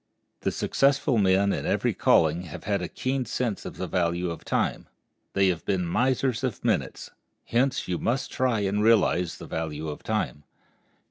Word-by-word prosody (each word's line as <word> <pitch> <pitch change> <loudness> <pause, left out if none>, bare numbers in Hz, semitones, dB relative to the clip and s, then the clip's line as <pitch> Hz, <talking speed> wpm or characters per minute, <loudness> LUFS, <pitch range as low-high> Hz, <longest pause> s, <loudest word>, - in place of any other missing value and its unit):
The - - -1
successful 135 -3 +2
men 100 0 +3
in - - -3
every - - +1
calling 80 +2 +3
have 75 - -9
had 100 -2 0
a 90 - -2
keen 130 +6 -2
sense 120 -5 -2
of - - -7
the 95 - -3
value 85 0 0
of 85 - -8
time—they 100 0 -2
have 85 -3 -2
been 90 -2 0
misers 130 +5 +1
of 125 -5 -3
minutes. - - -1 0.3
Hence 130 +3 +1
you 90 -2 -1
must 125 +3 -1
try 125 -4 +1
and 100 +1 0
realize 100 -6 +3
the - - -9
value 80 -1 -4
of 75 - -7
time. 75 - -2
100 Hz, 170 wpm, -26 LUFS, 85-125 Hz, 0.3 s, men